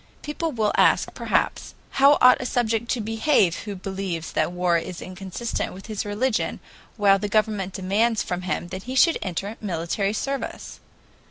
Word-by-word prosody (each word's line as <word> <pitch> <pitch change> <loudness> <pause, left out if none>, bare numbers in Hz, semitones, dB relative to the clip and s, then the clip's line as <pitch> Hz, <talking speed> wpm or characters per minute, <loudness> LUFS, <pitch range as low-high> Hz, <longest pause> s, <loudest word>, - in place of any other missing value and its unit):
People 315 +2 -3
will 220 -5 +1
ask, - - +3
perhaps: - - -1 0.2
How 280 +2 +5
ought 250 0 +7
a - - -4
subject 235 -1 0
to 245 - 0
behave 220 - +2
who 205 -1 -6
believes 190 -3 -4
that - - 0
war 180 -1 +1
is 175 +1 -7
inconsistent 190 +5 -4
with 190 +1 -11
his 215 -3 -4
religion 215 +4 -1 0.4
while 200 -2 +4
the 205 +1 -3
government 210 -3 0
demands 210 +4 +1
from 180 0 -3
him 180 -1 -3
that 185 - -6
he 260 - -3
should 330 +4 +4
enter 195 +4 -4
military 195 +1 -1
service? 275 +5 -4
205 Hz, 165 wpm, -24 LUFS, 185-235 Hz, 0.4 s, ought